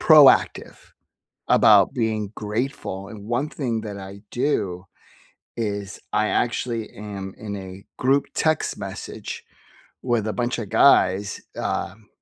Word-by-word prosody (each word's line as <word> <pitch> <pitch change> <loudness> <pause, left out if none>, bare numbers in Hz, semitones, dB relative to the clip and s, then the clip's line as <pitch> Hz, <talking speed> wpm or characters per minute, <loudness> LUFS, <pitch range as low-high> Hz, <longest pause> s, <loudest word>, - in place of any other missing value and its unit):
proactive 150 -4 +6 0.7
about - - +6
being 110 -3 -1
grateful, 105 -3 -3
and 105 -2 -10
1 120 +6 0
thing 120 -7 -2
that 105 -2 -6
I 100 0 -9
do 100 -9 -1 0.7
is 100 -3 -3
I 105 0 +2
actually 115 -2 -1
am 100 -2 -7
in 105 -1 -5
a 95 0 -9
group 135 +2 +2
text 155 -1 0
message - - -7 0.6
with 120 -4 0
a - - -1
bunch 120 +2 -1
of 110 -4 -4
guys, 100 -6 +4 0.2
um, 105 +1 -3
110 Hz, 125 wpm, -23 LUFS, 100-120 Hz, 0.7 s, proactive